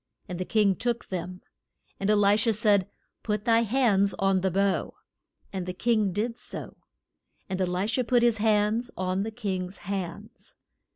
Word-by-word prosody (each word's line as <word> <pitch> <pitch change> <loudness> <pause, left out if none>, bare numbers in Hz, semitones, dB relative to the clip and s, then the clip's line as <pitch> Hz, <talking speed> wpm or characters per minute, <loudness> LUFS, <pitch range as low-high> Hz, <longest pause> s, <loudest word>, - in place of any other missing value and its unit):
And 180 -2 -5
the 185 - -2
king 205 -2 +3
took 235 +2 -2
them. 180 0 -5 0.6
And 195 - -1
E 210 - +5
li 205 0 +4
sha 225 +1 +2
said, 205 -2 +2 0.3
Put 210 -1 -2
thy 230 -1 +5
hands 210 -5 +2
on 195 -1 +2
the 190 - +1
bow. 195 +1 0 0.6
And 185 -2 -4
the 180 - -4
king 215 -2 +1
did 225 +5 -2
so, - - -7 0.7
and 190 -1 -3
E - - +3
li 180 +2 -1
sha 225 +4 0
put 245 0 +2
his 235 -2 +3
hands 215 +2 +2
on 185 +1 -1
the 215 - -2
king's 190 -5 -4
hands. 180 -2 -6
200 Hz, 175 wpm, -27 LUFS, 185-225 Hz, 0.7 s, E